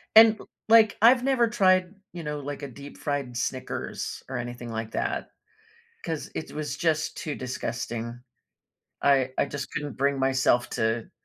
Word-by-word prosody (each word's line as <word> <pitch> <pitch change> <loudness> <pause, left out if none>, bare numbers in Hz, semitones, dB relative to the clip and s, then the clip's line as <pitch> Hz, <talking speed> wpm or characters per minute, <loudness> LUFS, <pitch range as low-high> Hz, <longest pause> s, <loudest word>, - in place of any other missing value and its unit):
And, 220 -1 +9
l - - -13 0.2
like, 225 -2 +6
I've 245 +2 +7
never 260 -3 +3
tried, 185 -4 +3 0.2
you 170 -2 -7
know, 150 0 -3
like, 145 +1 -6
a - - -3
deep-fried 140 -1 -5
Snickers 130 +1 -4
or 130 -1 -4
anything 120 0 -5
like 110 0 -4
that, - - -2 0.7
'cause 160 -3 -4
it - - -5
was 150 -2 -4
just 160 -1 0
too 150 -3 -4
disgusting. 120 -2 -4 0.8
I 135 -2 +3
I - - +3
just 140 -1 -5
couldn't 145 -6 -4
bring 140 0 +1
myself 130 -2 +2
to 110 +1 -1
140 Hz, 155 wpm, -27 LUFS, 125-170 Hz, 0.8 s, And